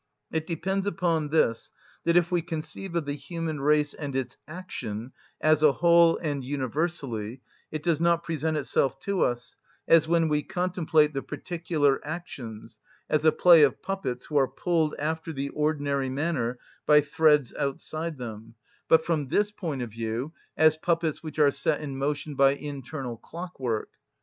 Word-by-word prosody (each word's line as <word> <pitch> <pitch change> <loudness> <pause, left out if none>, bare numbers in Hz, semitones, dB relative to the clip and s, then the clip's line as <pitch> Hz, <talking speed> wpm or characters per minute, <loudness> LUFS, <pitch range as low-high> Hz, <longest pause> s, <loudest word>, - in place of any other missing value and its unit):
It 160 0 -2
depends 190 +4 -1
upon 165 -4 0
this, 130 -7 +1 0.4
that 170 +1 +4
if 175 0 +2
we 175 -1 +2
conceive 165 +2 -5
of 170 -3 0
the 145 - -2
human 160 0 -4
race 150 0 +2
and 140 -3 -6
its 130 -1 -2
action 130 - -6 0.3
as 155 -1 +3
a 150 -2 +6
whole 170 0 +5
and 145 -5 -3
universally, 130 -4 -3 0.3
it 155 -1 -5
does 165 -3 +1
not 170 0 +3
present 160 -1 -1
itself 135 -2 0
to 200 -2 -1
us, 120 0 -1 0.3
as 165 -1 +5
when 165 -1 +3
we 150 -1 +1
contemplate 175 -4 +1
the 135 - -2
particular 160 -6 -1
actions, 140 -9 -7 0.3
as 155 0 +2
a 155 - +7
play 170 -1 +7
of 145 - +3
puppets 195 -11 -3
who 150 - -1
are 135 -2 +4
pulled 165 -2 0
after 160 +2 -2
the 140 -2 -3
ordinary 145 -3 0
manner 130 -4 -1 0.3
by 150 0 +7
threads 150 -2 +3
outside 155 +3 -3
them; 115 -2 -8 0.3
but 160 0 +5
from 155 -5 0
this 205 +9 +1
point 165 -11 -4
of 115 - -7
view, 115 +6 -4 0.2
as 155 0 +5
puppets 165 -1 0
which 155 -2 -8
are 145 -2 +5
set 150 +2 0
in 145 -3 -5
motion 145 +2 -2
by 135 0 +5
internal 140 -3 -6
clockwork. 135 -9 -4
150 Hz, 165 wpm, -27 LUFS, 135-165 Hz, 0.4 s, a